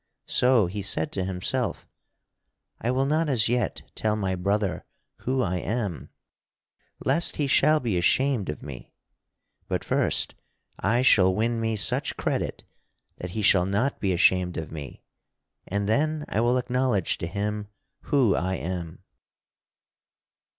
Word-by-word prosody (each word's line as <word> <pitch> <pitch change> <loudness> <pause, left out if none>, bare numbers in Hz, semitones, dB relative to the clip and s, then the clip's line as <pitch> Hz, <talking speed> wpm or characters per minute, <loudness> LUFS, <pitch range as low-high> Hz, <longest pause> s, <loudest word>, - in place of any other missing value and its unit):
So 125 -4 +3
he 100 +4 -4
said 85 -4 0
to 95 - -2
himself: 90 -1 -2 0.9
"I 115 - -1
will 130 +2 +1
not 155 +2 +1
as 115 -6 +4
yet 120 +1 -1
tell 110 -1 0
my 95 -3 -1
brother 100 +1 -1 0.3
who 130 0 -1
I 90 -3 -1
am, 100 -2 -3 1.0
lest 145 +6 +2
he 150 - 0
shall 155 +3 +4
be 110 -10 -1
ashamed 130 - +2
of 75 - -5
me. 70 -4 -9 0.7
But - - -2
first - - 0 0.5
I 115 +6 +2
shall 95 -7 +5
win 115 +2 0
me 110 0 0
such 105 - +1
credit - - -2 0.5
that 90 - -6
he 110 - -1
shall 95 -3 +4
not 105 +8 0
be 95 - 0
ashamed 90 0 +3
of 80 -1 -5
me, 75 -4 -8 0.6
and 100 +1 -1
then 150 +7 0
I 110 - 0
will 120 +2 +3
acknowledge 125 -6 0
to 85 - -3
him 105 +3 -3 0.4
who 130 -9 +3
I 95 +1 -1
am." 85 -2 -5
105 Hz, 145 wpm, -26 LUFS, 95-125 Hz, 1.0 s, shall